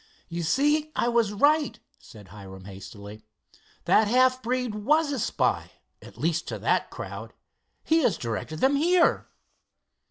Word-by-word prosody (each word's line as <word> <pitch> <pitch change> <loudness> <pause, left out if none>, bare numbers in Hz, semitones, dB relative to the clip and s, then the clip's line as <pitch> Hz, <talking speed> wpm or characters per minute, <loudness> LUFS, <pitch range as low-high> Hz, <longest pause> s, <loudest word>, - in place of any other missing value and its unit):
"You 170 0 -4
see, 295 - +1
I 240 - +1
was 235 -3 +2
right," 285 +1 +2 0.2
said 105 -4 -15
Hiram 95 -1 -11
hastily. 100 +2 -10 0.6
"That 215 - +4
half 255 +3 +3
breed 250 -1 -2
was 290 +9 +1
a 275 - -2
spy, 225 - -1 0.3
at - - -14
least 165 +1 -1
to - - -4
that - - 0
crowd. - - -8 0.5
He 320 +1 +3
has 240 - +1
directed 120 +7 -5
them 275 +2 +3
here." 345 +3 +3
230 Hz, 145 wpm, -26 LUFS, -, 0.6 s, That